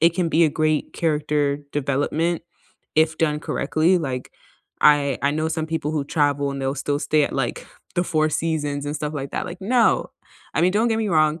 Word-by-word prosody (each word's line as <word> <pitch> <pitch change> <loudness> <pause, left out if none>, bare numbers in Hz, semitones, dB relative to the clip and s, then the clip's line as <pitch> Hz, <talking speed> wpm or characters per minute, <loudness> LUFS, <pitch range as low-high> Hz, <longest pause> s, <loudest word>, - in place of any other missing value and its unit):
it 165 +1 +5
can 175 -2 0
be 165 +1 +4
a 155 - +3
great 155 0 0
character 150 -3 0
development 150 +4 0 0.5
if 160 0 +3
done 150 -2 +1
correctly, 160 +4 +1
like, 130 -6 -4 0.5
I 145 -3 +4
I 140 - +3
know 155 +1 -1
some 160 -1 -2
people 160 -2 -2
who 150 -3 -1
travel 145 -1 +1
and 140 - -5
they'll 135 +1 -1
still 145 0 0
stay 155 -1 +2
at, - - -4
like, - - -2 0.3
the 175 - +2
Four 155 -2 +1
Seasons 145 -3 -1
and 145 - -3
stuff 150 +1 -4
like 140 -1 -4
that, - - -2
like, 175 +1 -8
"No," 230 +3 +2 0.4
I - - +2
mean, 180 - +4
don't 220 +4 +2
get 225 -1 +1
me 220 -2 -1
wrong; 155 -2 +2
155 Hz, 205 wpm, -22 LUFS, 145-165 Hz, 0.5 s, it